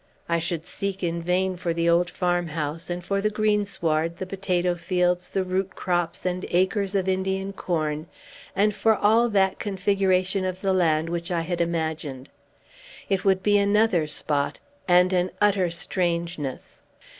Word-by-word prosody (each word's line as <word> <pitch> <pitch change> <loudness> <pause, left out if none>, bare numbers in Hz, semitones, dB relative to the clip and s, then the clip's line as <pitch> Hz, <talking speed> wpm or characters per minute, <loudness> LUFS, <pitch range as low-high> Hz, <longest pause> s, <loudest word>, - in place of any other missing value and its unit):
I 170 0 +1
should 165 -1 -3
seek 195 -1 -4
in 170 0 -1
vain 180 +2 0
for 170 -1 -2
the 170 0 +1
old 170 +1 +3
farmhouse, 170 -3 -2
and 175 0 -4
for 200 +1 0
the 215 - +2
greensward, 200 -7 0
the 190 - -4
potato 180 -2 0
fields, 180 0 0
the 190 - 0
root 185 0 -2
crops, 175 -1 -2
and 180 0 -1
acres 190 +2 +1
of 190 -1 +1
Indian 190 +1 -1
corn, 155 -4 -2 0.5
and 210 +1 +3
for 220 +2 +3
all 225 +4 +3
that 195 -3 +2
configuration 195 -1 +1
of 185 0 -3
the 195 -1 +1
land 160 -3 +2
which 170 0 -3
I 175 -2 0
had 170 +1 -2
imagined. 160 -5 -3 0.8
It 195 -2 +1
would 190 -1 +2
be 205 -1 +4
another 200 -5 +3
spot, 145 -1 -1 0.3
and 180 +1 +5
an 180 0 +2
utter 200 -3 +3
strangeness. 170 -4 -3
180 Hz, 155 wpm, -25 LUFS, 170-195 Hz, 0.8 s, and